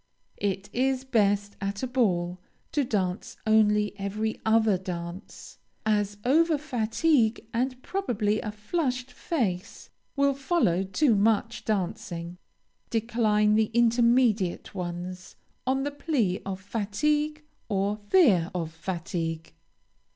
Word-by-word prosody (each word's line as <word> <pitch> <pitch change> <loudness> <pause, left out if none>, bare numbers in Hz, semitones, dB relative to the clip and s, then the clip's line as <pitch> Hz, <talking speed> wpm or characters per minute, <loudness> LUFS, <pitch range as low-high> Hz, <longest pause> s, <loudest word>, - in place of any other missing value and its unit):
It 195 0 -1
is 260 +1 +1
best 205 -5 +1
at 200 +3 -3
a - - +2
ball, 185 -9 0 0.3
to 290 - +1
dance 195 -6 -2
only 210 -1 +3
every 215 +3 -2
other 220 -2 +4
dance, 180 0 -7 0.3
as 205 -1 +1
over 315 +4 +4
fatigue, 240 -3 +1
and 255 +2 -1
probably 220 - -1
a 210 - -4
flushed 250 +3 -2
face, 200 - -3 0.2
will 280 0 +3
follow 265 - +1
too 230 +7 +2
much 225 +3 +1
dancing. 180 -4 -3 0.5
Decline 220 -2 +2
the 215 0 +3
intermediate 235 -4 +3
ones, 180 0 -6 0.3
on 265 +1 +1
the 290 - -2
plea 280 - 0
of 190 -1 -3
fatigue, 295 +10 -1 0.3
or 200 0 +1
fear 205 - +4
of 165 -3 -2
fatigue. 165 - -4
215 Hz, 115 wpm, -27 LUFS, 195-250 Hz, 0.5 s, other